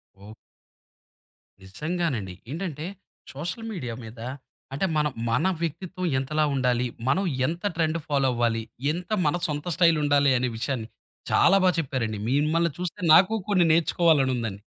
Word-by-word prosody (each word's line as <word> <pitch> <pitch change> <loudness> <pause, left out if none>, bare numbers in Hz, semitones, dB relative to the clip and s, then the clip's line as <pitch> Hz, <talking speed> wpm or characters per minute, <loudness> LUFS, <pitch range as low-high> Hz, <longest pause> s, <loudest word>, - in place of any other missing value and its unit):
ఓ 100 +2 -13 1.3
నిజంగానండి. 130 - -3 0.2
ఏంటంటే, 160 -2 -4 0.5
social 170 +10 -5
media 125 - -5
మీద 115 +1 -11 0.5
అంటే 145 +8 0
మనం 150 -2 +1 0.2
మన 125 +10 +1 0.2
వ్యక్తిత్వం 180 +3 -4
ఎంతలా 155 +3 0
ఉండాలి? 125 -1 +1 0.2
మనం 185 +9 +2 0.2
ఎంత 170 +2 -4
ట్రెండ్ 165 0 +1
ఫాలో 140 -2 +2
అవ్వాలి? 115 -1 +1 0.3
ఎంత 175 +5 -5 0.2
మన 150 +2 +2
సొంత 145 0 -4
స్టైలుండాలి? 145 -5 +4
అనే 125 0 0
విషయాన్ని 120 -2 -3 0.4
చాలా 195 - +5
బాగా 185 -2 +4
చెప్పారండి. 120 -8 -2
మిమ్మల్ని 155 +4 +2
చూస్తే 180 +3 -4
నాకు 185 +6 +6 0.2
కొన్ని 180 -4 +4
నేర్చుకోవాలని 160 -5 +3
ఉందండి. 105 -4 -5
150 Hz, 130 wpm, -25 LUFS, 125-170 Hz, 1.3 s, నాకు